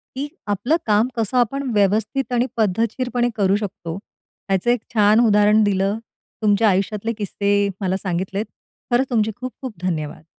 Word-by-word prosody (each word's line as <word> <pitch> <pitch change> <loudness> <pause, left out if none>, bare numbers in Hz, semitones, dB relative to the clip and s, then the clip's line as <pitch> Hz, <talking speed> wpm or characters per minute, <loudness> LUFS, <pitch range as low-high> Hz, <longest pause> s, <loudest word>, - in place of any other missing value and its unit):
की 275 +2 -3 0.2
आपलं 205 +9 +1
काम 215 +2 +3
कसं 230 +2 -1
आपण 265 +3 +1
व्यवस्थित 215 +6 +1
आणि 245 +1 +2
पद्धतशीरपणे 230 +4 0
करू 195 -2 +2
शकतो, 190 -5 -4 0.5
ह्याचं 195 +4 +1
एक 245 -3 +1
छान 210 0 +5
उदाहरण 210 0 +4
दिलं. 200 +1 +1 0.4
तुमच्या 210 +1 +4
आयुष्यातले 205 +4 0
किस्से 200 0 0 0.2
मला 190 0 0
सांगितलेत. 190 +3 -2 0.5
खरंच 260 +3 +2
तुमचे 220 -2 +1
खूप-खूप 255 -1 -6
धन्यवाद. 160 -4 -3
210 Hz, 140 wpm, -21 LUFS, 195-240 Hz, 0.5 s, छान